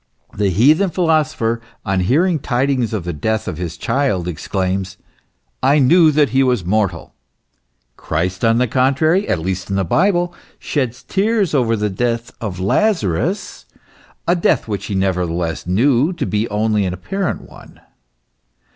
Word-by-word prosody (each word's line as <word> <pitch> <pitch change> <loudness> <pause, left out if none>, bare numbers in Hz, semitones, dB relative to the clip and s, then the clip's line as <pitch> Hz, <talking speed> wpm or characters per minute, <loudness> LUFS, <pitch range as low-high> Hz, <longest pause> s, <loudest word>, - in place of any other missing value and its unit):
The 100 -1 0
heathen 150 - +4
philosopher, 155 -10 0 0.2
on 95 -2 0
hearing 155 - +2
tidings 130 -2 0
of 105 -5 -3
the 85 0 -4
death 110 +8 -2
of 90 -3 -4
his 85 -1 -5
child, 130 -11 0
exclaims: 95 +3 -3 0.3
" - - -48 0.3
I 135 +3 +4
knew 155 +4 +5
that 150 -2 +3
he 130 +4 +2
was 125 -8 +1
mortal." 95 -3 -1 0.8
Christ, 90 +5 -2
on 115 0 +4
the 125 - +3
contrary, 140 - +1
at - - +2
least 90 +3 -4
in 100 - -1
the 95 - +1
Bible, 175 - +1 0.2
sheds 125 -5 -3
tears 205 -2 0
over 120 -5 +2
the 105 -1 -1
death 115 +3 -2
of 100 -5 -4
Lazarus, 145 - 0 0.6
a 175 - +3
death 170 - +1
which 105 -3 -4
he 100 - -3
nevertheless 90 -4 -1
knew 125 - +2
to - - -3
be 105 +2 -1
only 105 0 +1
an 90 -1 -2
apparent 190 - -3
one. - - -16
115 Hz, 155 wpm, -18 LUFS, 95-150 Hz, 0.8 s, knew